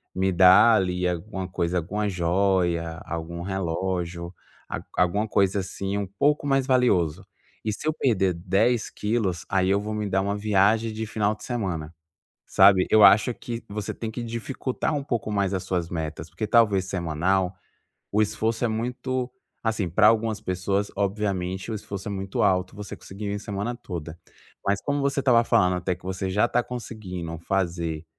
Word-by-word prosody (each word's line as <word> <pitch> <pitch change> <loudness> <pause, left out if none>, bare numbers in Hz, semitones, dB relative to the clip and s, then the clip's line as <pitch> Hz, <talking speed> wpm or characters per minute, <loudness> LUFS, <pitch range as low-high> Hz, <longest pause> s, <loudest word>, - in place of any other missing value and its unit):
me 95 0 +1
dar 95 +6 +7
ali 90 -2 0
alguma 95 +2 -3
coisa 90 0 -1
alguma 105 +5 -2
joia, 85 -2 +1
algum 85 +1 -5
relógio. 90 -1 -3 0.3
A - - -4 0.2
alguma 100 +5 +2
coisa, 100 -1 +2
assim, 95 +1 -4
um 100 -2 -2
pouco 145 +9 +1
mais 135 -1 +2
valioso. 95 - +2 0.4
E 110 - -1
se 150 +9 -5
eu 155 - +2
perder 95 - +1
10 110 +7 +1
quilos, 105 -5 -1
aí, 95 -1 +1
eu 100 +1 +3
vou 105 +1 -4
me 105 -1 -2
dar 95 0 +2
uma 100 +1 -1
viagem 105 +2 +2
de 110 +1 -3
final 105 -1 0
de - - -15
semana", 90 -10 -3 0.5
sabe. 95 -1 +5
Eu 110 -1 +6
acho 110 +4 +6
que 115 0 -6
você 100 0 -4
tem 115 - -5
que 120 +2 -5
dificultar 125 +5 -3
um 140 - -2
pouco 120 -6 -2
mais 100 -2 0
as 95 -1 -2
suas 90 -2 -2
metas, 80 -1 -5
porque 110 - -4
talvez 105 -4 +4
semanal, 90 +1 0 0.6
o 105 +1 +3
esforço 110 +2 0
é - - +2
muito 125 +3 -2 0.3
assim 110 -5 0
pra 105 +5 +5
algumas 110 -1 +2
pessoas, 95 +2 -1
obviamente, 100 -1 -2
o - - -2
esforço 100 -1 -6
muito 95 -1 -3
alto, 90 0 +2
você 105 -1 -7
conseguiria 100 +1 -6
em - - -4
semana 105 +4 -3
toda. 85 -8 -7 0.5
Mas 100 0 +1
como 145 0 -1
você 140 0 0
estava 120 -3 +4
falando 90 -7 +3
até 90 +1 -1
que 90 - -22
você 95 0 -3
já 105 +5 +3
está 120 0 +1
conseguindo 95 -9 -6
fazer 85 -3 -2
100 Hz, 170 wpm, -25 LUFS, 90-110 Hz, 0.6 s, dar